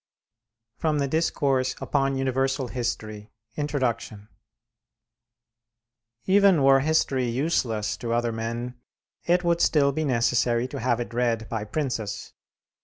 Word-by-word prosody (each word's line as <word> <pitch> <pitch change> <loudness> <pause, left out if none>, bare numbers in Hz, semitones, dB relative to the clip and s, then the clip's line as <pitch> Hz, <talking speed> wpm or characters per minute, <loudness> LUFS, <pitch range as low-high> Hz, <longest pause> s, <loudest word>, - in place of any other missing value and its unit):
FROM 155 -2 0
THE 140 -1 0
'DISCOURSE 135 -4 0
UPON 135 -1 0
UNIVERSAL 135 0 0
HISTORY' 110 -4 -4 0.3
INTRODUCTION 125 -8 -3 2.0
Even 195 -5 +4
were 135 0 +6
history 135 -3 +1
useless 115 -5 -1
to 115 - -4
other 120 0 +1
men, 115 +2 -4 0.5
it 175 +1 +2
would 170 -1 +1
still 140 -3 +3
be 155 +3 -2
necessary 120 -2 +1
to - - -6
have 120 0 0
it 120 -1 -5
read 115 -2 0
by 110 -2 -3
princes. 115 -4 -4
130 Hz, 115 wpm, -25 LUFS, 115-145 Hz, 2.0 s, were